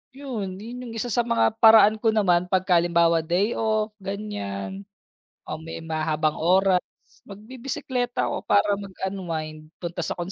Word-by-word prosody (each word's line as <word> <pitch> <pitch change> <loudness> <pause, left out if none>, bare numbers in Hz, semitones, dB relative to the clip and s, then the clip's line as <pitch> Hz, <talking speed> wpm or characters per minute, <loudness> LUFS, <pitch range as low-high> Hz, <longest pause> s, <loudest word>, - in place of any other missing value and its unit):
'yon, 230 -10 -5
'yon 235 +5 -8
yung 225 - -8
isa 240 +2 -3
sa 240 - +2
mga, 235 -1 +3
paraan 220 -1 +7
ko 225 - +3
naman, 180 -4 +3
pagka 185 -2 +3
halimbawa 170 -1 +3
day 180 +7 0
off, 215 -1 0
ganyan, 195 - -5 0.7
o - - -3
may 165 0 -8
mahabang 155 -1 -1
oras, 185 +2 +4 0.5
magbibisikleta 245 +3 -4
ako - - -2
para 205 0 +3
mag-unwind, 175 -6 -5
punta 175 0 -5
sa - - -3
kung 175 +2 -5
195 Hz, 145 wpm, -24 LUFS, 170-220 Hz, 0.7 s, paraan